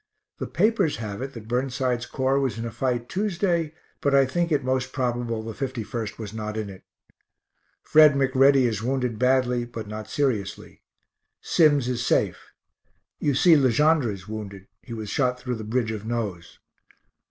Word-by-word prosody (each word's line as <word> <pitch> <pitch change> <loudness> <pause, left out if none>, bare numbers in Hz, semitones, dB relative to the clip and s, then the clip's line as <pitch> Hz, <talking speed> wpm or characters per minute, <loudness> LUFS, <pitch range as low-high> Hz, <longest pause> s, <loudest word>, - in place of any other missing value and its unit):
The - - -3
papers 205 -4 +2
have 105 -1 -5
it 135 +1 -5
that 110 -2 -9
Burnside's 125 0 -1
Corps 135 +1 +1
was 130 -6 -1
in 115 - -4
a 115 - -4
fight 120 0 -2
Tuesday, 175 -4 -1 0.3
but 140 -1 +2
I 135 -1 +6
think 170 +6 -1
it 145 -3 +2
most 130 0 -1
probable 120 -3 -2
the 115 0 -6
51st 120 -3 -4
was 110 -2 -7
not 110 -1 -4
in 105 -2 -4
it. 95 - -12 1.0
Fred 155 -1 +6
McReady 135 0 +4
is 110 -3 -1
wounded 125 -2 -1
badly, 125 -1 +2
but 115 -2 -7
not 110 0 -7
seriously. 115 -9 -2 0.6
Sims 145 -6 +3
is 125 -1 -1
safe. - - 0 0.7
You 145 -2 +1
see 165 +5 +6
Le 135 -3 +4
Gendre 150 0 +3
is 95 -2 -9
wounded 100 -3 -7 0.2
he - - -13
was 110 -3 -5
shot 125 0 +1
through 125 0 -3
the 110 - -6
bridge 110 +1 -1
of 110 -2 -5
nose. 110 -7 -4
125 Hz, 170 wpm, -25 LUFS, 110-135 Hz, 1.0 s, I